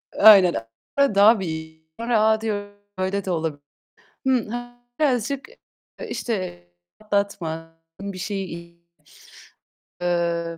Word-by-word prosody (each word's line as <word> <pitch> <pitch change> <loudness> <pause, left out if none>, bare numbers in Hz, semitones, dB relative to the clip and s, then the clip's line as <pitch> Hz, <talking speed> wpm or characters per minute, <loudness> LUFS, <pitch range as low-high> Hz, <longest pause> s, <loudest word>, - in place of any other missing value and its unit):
Aynen, 195 -4 +8 0.4
daha 220 -5 +6
bir 160 -3 -5 0.2
A! 220 -2 +3
Diyorum. 205 -2 -3 0.2
Öyle 190 +1 -1
de 190 - -1
olabilir. 160 -4 -2 0.6
Hmm, 260 -4 +2 0.5
birazcık, 270 -1 0 0.6
işte, 185 - -3 0.4
atlatma, 180 -6 -2 0.3
bir 200 -1 -5
şeyi, 170 -3 -5 1.2
emm, 170 -1 0
195 Hz, 85 wpm, -23 LUFS, 170-215 Hz, 1.2 s, Aynen